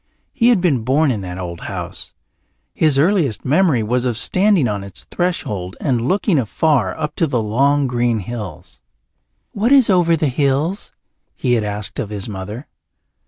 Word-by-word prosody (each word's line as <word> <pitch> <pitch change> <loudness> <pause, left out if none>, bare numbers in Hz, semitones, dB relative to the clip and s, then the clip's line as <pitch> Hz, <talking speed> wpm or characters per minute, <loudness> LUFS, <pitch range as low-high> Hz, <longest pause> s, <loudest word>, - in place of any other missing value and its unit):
He 235 -1 +3
had 230 -7 +3
been 150 -10 +2
born 140 +4 +2
in 105 -5 -2
that 90 -1 -6
old 85 -2 -6
house; - - -6 0.6
his 155 -4 +2
earliest 155 - +1
memory 145 -4 +3
was 120 +3 0
of 120 -3 -1
standing 185 - +2
on 100 -2 -3
its 100 -1 -10
threshold 105 - -2
and 125 -4 0
looking 190 -3 +2
afar 125 - 0
up 150 -1 -3
to 165 - +2
the 125 -4 0
long 140 +6 +2
green 120 -2 0
hills. 105 -1 -8 0.7
"What 220 +5 0
is 265 -6 +6
over 175 -3 +4
the 155 -1 0
hills?" 145 - 0 0.4
he 125 -2 0
had 115 -3 +1
asked 105 +2 -3
of 115 -7 -3
his 105 -2 -5
mother. 105 +6 -6
130 Hz, 165 wpm, -19 LUFS, 105-165 Hz, 0.7 s, is